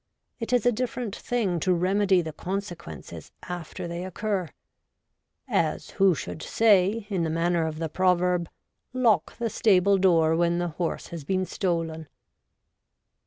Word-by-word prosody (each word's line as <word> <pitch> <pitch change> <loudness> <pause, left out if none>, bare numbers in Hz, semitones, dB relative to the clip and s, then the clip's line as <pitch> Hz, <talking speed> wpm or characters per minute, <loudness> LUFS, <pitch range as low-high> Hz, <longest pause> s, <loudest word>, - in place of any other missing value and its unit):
It 230 0 -4
is 245 -3 +2
a 245 - +5
different 240 -2 -3
thing 210 -8 -1
to 180 +2 +2
remedy 190 +1 +2
the 160 -1 -6
consequences 185 -1 -6
after 175 -1 -6
they 170 +1 -5
occur' 190 -1 -2 0.6
— - - -54 0.2
as - - -1
who 195 -3 +4
should 90 - -6
say, 210 0 +3
in 190 -3 0
the 165 - 0
manner 165 0 +1
of 155 -1 -5
the 165 0 -2
proverb, 180 0 +1 0.4
Lock 240 -5 +2
the 235 0 -1
stable 195 -2 +4
door 165 -4 +4
when 170 +1 +2
the 175 0 -1
horse 165 +1 -3
has 165 -3 -7
been 185 +5 0
stolen. 165 -4 -2
180 Hz, 150 wpm, -26 LUFS, 170-200 Hz, 0.6 s, a